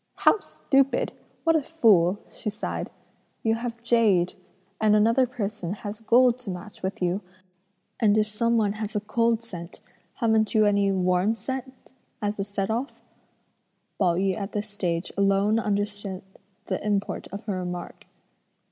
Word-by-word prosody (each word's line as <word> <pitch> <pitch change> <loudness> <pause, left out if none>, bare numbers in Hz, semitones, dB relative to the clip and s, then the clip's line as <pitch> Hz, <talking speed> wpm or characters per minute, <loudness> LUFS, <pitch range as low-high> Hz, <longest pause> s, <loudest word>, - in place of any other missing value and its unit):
"How - - +4
stupid! 275 -7 +1 0.3
what 325 -1 +4
a 315 - +3
fool!" 210 - +4
she - - -5
sighed; 210 +2 -4 0.5
"you 225 - +3
have 230 0 -4
jade, 215 -7 +3 0.5
and 215 -1 +5
another 230 +5 +4
person 210 -6 -4
has 210 -1 -6
gold 245 +2 +4
to 245 -5 -8
match 185 +3 -7
with 190 0 -3
you, 180 +3 0 0.8
and 215 -2 +4
if 215 - +4
some 230 +2 +1
one 210 -3 +2
has 215 0 -3
'cold' 230 +1 +1
scent, 175 -6 -9 0.4
haven't 220 -3 +2
you 215 -1 +5
any 200 -1 +3
'warm' 185 +3 +2
scent 260 +4 -7 0.3
as 205 -1 -2
a - - +1
set 200 +1 -2
off?" 245 +6 -3 1.0
Pao 175 -3 +3
yü 190 +1 +1
at 200 0 -5
this 210 0 -3
stage 175 -4 -2
alone 200 +2 +3
understood 205 -2 -2 0.4
the - - -3
import 205 -1 -1
of 200 +2 -6
her 210 - -2
remark. 180 -1 -6
210 Hz, 150 wpm, -26 LUFS, 195-230 Hz, 1.0 s, and